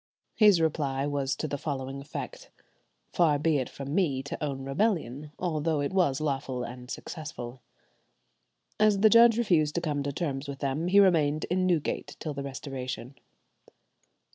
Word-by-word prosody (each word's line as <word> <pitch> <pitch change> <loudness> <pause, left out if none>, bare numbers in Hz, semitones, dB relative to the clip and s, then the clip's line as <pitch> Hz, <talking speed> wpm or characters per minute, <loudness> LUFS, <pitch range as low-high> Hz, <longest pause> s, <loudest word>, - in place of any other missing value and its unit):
His 205 -5 +6
reply 145 -4 0
was 140 -2 -1
to 155 - -3
the 145 -1 -4
following 135 -2 -4
effect: - - -7 0.6
"Far 160 -4 +3
be 150 0 +2
it 130 - -3
from 140 +1 -6
me 145 -8 +1
to 145 - -6
own 135 -2 -3
rebellion, 145 - -1
although 160 -3 0
it 145 +5 -2
was 170 -8 +2
lawful 135 -4 -2
and 125 +1 -8
successful." 130 -7 -7 1.2
As 210 -2 +4
the 215 0 +6
judge 230 -1 +7
refused 165 -10 +2
to 170 - 0
come 150 -4 -1
to 140 0 -2
terms 140 -2 -3
with 140 -1 -5
them, 140 +4 -2
he 200 +3 +5
remained 155 -6 +3
in 185 0 +2
Newgate 170 -5 -1
till 155 - -4
the 140 - -5
Restoration. 135 -2 -6
145 Hz, 160 wpm, -28 LUFS, 135-175 Hz, 1.2 s, judge